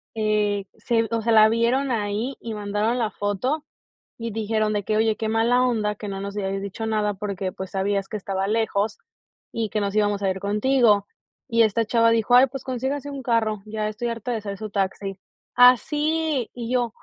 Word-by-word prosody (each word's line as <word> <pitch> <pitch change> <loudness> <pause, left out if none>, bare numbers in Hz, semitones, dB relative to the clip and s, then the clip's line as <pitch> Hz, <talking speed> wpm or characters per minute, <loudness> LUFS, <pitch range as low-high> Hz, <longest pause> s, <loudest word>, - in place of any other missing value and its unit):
eh, 210 -2 0
se 230 -1 0
o 230 -1 0
sea, 230 +1 0
la 215 0 +7
vieron 240 +4 +1
ahí 220 +3 -2
y 225 -1 -6
mandaron 210 +3 -1
la 225 -3 +1
foto 250 +10 -2 0.5
y 230 -1 -4
dijeron 215 0 0
de 205 - -1
que: 215 +2 0
"Oye, 220 -1 +2
qué 220 - -3
mala 235 +3 +3
onda 215 -4 0
que 210 - -7
no 195 -1 -4
nos 200 0 -6
hayas 195 0 -2
dicho 200 +3 -5
nada 210 -2 0
porque, 195 -2 -3
pues, 190 0 -7
sabías 195 0 -1
que 215 - -4
estaba 195 -1 -2
lejos 220 -1 0 0.5
y 225 -2 -2
que 215 -1 -1
nos 200 +1 -2
íbamos 205 -1 +1
a 195 - +1
ir 190 0 -2
contigo". 210 0 +2 0.4
Y 230 -2 +4
esta 225 +1 +1
chava 230 +1 +3
dijo: 230 +1 +3
"Ay, 255 +2 +8
pues 270 0 -7
consíganse 265 +3 -3
un 275 -2 -6
carro, 220 -4 0
ya 215 0 -3
estoy 225 +3 -3
harta 230 +1 -4
de 225 - -2
ser 200 -1 -5
su 215 +2 -6
taxi". 195 -1 -2 0.4
¡Así! 295 +2 +3
Y 240 -1 -5
yo, 240 -3 0
220 Hz, 200 wpm, -24 LUFS, 205-235 Hz, 0.5 s, Ay